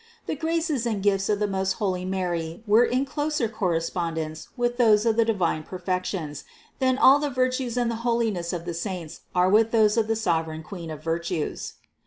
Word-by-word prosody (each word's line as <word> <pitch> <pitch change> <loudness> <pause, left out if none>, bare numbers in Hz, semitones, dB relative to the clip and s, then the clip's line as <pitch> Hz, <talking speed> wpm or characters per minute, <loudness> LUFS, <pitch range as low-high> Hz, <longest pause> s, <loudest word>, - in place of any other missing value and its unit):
The - - -2
graces 320 -5 -1
and 210 -4 -2
gifts 195 -1 +2
of 210 - +2
the 210 - 0
most 190 -1 0
holy 185 -3 -2
Mary 175 -1 -3
were 215 +3 +5
in 255 +3 0
closer 295 -3 -1
correspondence 165 -5 -2
with 240 0 0
those 220 -3 +4
of 225 -1 +3
the 230 - +4
divine 185 -8 0
perfections, 180 -3 -3 0.4
than 260 -1 +2
all 275 +1 +7
the 295 0 -1
virtues 255 -1 -1
and 240 -1 +1
the 230 - -3
holiness 225 -8 0
of 175 -1 -4
the 175 - -3
saints 170 -2 -5
are 180 0 +4
with 215 +3 +4
those 220 -1 +3
of 220 -1 +2
the 225 - +1
sovereign 165 -6 -1
Queen 170 -1 -8
of 155 -1 -7
virtues. 165 0 -2
205 Hz, 190 wpm, -25 LUFS, 170-235 Hz, 0.4 s, all